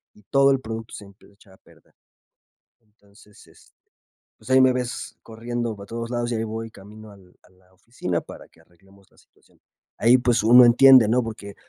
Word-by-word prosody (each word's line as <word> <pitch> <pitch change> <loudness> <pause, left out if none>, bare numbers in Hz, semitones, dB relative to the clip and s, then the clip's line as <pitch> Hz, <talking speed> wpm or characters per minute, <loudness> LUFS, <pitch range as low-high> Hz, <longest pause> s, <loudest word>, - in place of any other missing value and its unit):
y 105 - -23
todo 140 +6 +2
el 135 - 0
producto 115 -1 -9
se 105 - -12
emp 100 0 -21
echa 100 -1 -23
a - - -21
perder. - - -26 0.9
Entonces, 105 -1 -23
este, - - -24 0.7
pues - - -17
ahí 130 0 +5
me 130 -1 +3
ves 125 -1 -6
corriendo 115 0 -6
para 100 0 -13
todos 115 +2 -7
lados 120 0 -3
y - - -2
ahí 110 - -3
voy 115 +1 -7
camino 105 +2 -15
al 95 -3 -21
a - - -25
la 95 0 -30
oficina 90 -4 -6
para - - -14
que 80 - -27
arreglemos 95 +3 -26
la - - -30
situación. - - -30 0.4
Ahí, 120 +3 +4
pues 120 -2 0
uno 120 +3 +7
entiende, 125 0 +6
¿no? 125 +2 +1
Porque, 105 -3 -10
110 Hz, 195 wpm, -22 LUFS, 100-120 Hz, 0.9 s, uno